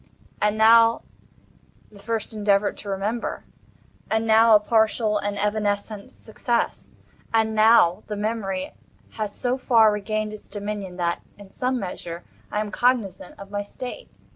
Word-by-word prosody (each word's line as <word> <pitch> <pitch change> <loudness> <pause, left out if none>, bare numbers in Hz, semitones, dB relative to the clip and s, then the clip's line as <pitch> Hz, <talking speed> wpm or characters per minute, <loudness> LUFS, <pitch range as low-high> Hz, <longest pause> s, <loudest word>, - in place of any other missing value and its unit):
And 210 +1 +1
now 230 +1 +5 0.9
the 205 - -15
first 220 +1 -4
endeavor 205 -1 +2
to 205 - -10
remember. 205 +4 -3 0.7
And 220 +1 0
now 225 0 +6
a - - +7
partial 220 0 +1
and 205 0 -3
evanescent 205 0 -2
success. 235 +2 -3 0.4
And 220 -1 +2
now 215 -4 +5
the 210 - -4
memory 205 -3 -3 0.4
has 210 -2 -5
so 250 +1 -1
far 225 -4 +5
regained 215 +1 -2
its 215 - -11
dominion, 205 -3 -6
that, 170 -1 -1 0.2
in 200 -2 -14
some 255 0 -1
measure, 175 -3 -6 0.3
I 210 - 0
am 210 -1 -5
cognizant 220 -8 -1
of 200 0 -11
my 205 0 -2
state. 250 - -8
210 Hz, 140 wpm, -24 LUFS, 200-225 Hz, 0.9 s, a